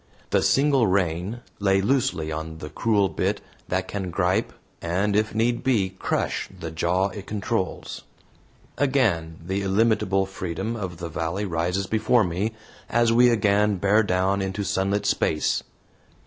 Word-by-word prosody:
The - - +3
single 135 -4 +3
rein 95 +4 0 0.2
lay 95 -1 +3
loosely 100 - 0
on 80 +1 -5
the 75 -1 -8
cruel 105 -3 +2
bit - - -1 0.3
that 95 +1 -1
can 95 -3 -4
gripe, 95 +5 0 0.3
and 95 +5 0
if 105 +1 +1
need 120 +2 +1
be, 105 -8 +2
crush - - -2
the 80 - -5
jaw 90 +4 +1
it 100 +1 -9
controls. 105 -2 -3 0.8
Again 110 - +1
the 95 +2 -1
illimitable 100 -1 +2
freedom 95 +3 -4
of 95 -6 -5
the 85 0 -5
valley 85 +6 -2
rises 90 +2 -1
before 110 +3 +2
me, 95 +5 -2 0.4
as 120 0 +3
we 120 +1 +6
again 105 -2 +3
bear 100 +4 +3
down 95 0 +1
into 95 +1 -2
sunlit 100 +2 0
space. 75 -5 +1
95 Hz, 145 wpm, -24 LUFS, 90-110 Hz, 0.8 s, we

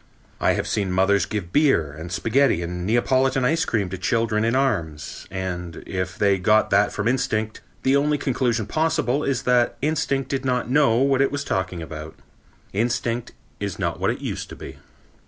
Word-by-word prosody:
I - - +3
have - - -2
seen 100 -4 -1
mothers 95 +2 +2
give 95 -6 -4
beer 135 - +3
and 80 +5 -8
spaghetti 115 -1 +2
and 90 +1 -4
Neapolitan 130 +3 +2
ice 165 +5 +2
cream 105 -5 0
to 95 - -6
children 110 0 +1
in 115 +2 +1
arms, 90 - -2
and, 90 -3 -5
if 90 -1 -4
they 100 -2 +3
got 105 +4 +3
that 100 +1 +4
from 105 +1 -2
instinct, 110 -3 -1 0.2
the 135 +1 +3
only 145 +1 +2
conclusion 120 -5 0
possible 155 0 0
is 130 -3 -1
that 125 -1 +2
instinct 145 -3 -1
did 135 -1 -2
not 125 -3 0
know 140 -5 +4
what 135 +1 +3
it 140 - +2
was 145 0 -2
talking 90 -7 -2
about. 75 0 -8 0.6
Instinct 120 +2 -1 0.3
is 100 -3 -4
not - - -2
what - - +1
it - - -3
used - - -4
to - - -8
be. - - -10
115 Hz, 180 wpm, -23 LUFS, 95-135 Hz, 0.6 s, that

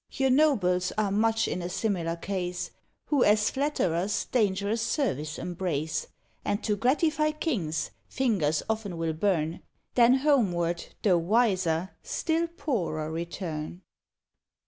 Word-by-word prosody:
Your 265 -2 +2
nobles 200 -11 +3
are 210 -2 +1
much 225 +2 +2
in 180 - -2
a 175 - -4
similar 180 -4 -1
case, 180 0 -3 0.4
Who 290 -4 +4
as 210 0 +4
flatterers 205 - 0
dangerous 205 -1 +1
service 155 - -1
embrace; 160 -4 -2 0.4
And 205 +2 -1
to 210 - +1
gratify 305 - +2
kings, 195 - -2 0.2
fingers 190 - +1
often 215 -5 -2
will 165 -1 -1
burn, 165 -2 0 0.3
Then 245 +1 +6
homeward, 190 - +2 0.2
though 185 -5 +4
wiser, 185 -3 +1
still 330 +1 0
poorer 180 - -2
return. 170 0 -5
195 Hz, 120 wpm, -28 LUFS, 170-240 Hz, 0.4 s, Then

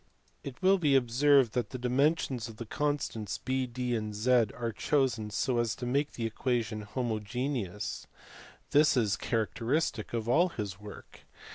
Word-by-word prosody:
It 135 +2 -9
will 190 +1 +5
be 145 -5 +3
observed 135 0 +4
that 125 0 -1
the 130 - -5
dimensions 125 -1 +1
of 110 - -11
the 115 - -6
constants 145 -7 -2
(B, 130 0 -1
D, 125 0 -2
and 105 -2 -3
Z) 120 +2 +4
are 115 -1 -2
chosen 130 -7 0
so 120 +4 0
as 115 -2 0
to 125 - -6
make 140 +4 0
the 115 - -3
equation 115 -2 -1
homogeneous: 110 -1 -3 0.6
this 150 -2 +5
is 105 -4 +2
characteristic 115 +3 -1
of 115 -1 -3
all 170 +9 +4
his 100 - -5
work. 105 0 -12
120 Hz, 155 wpm, -30 LUFS, 110-135 Hz, 0.6 s, will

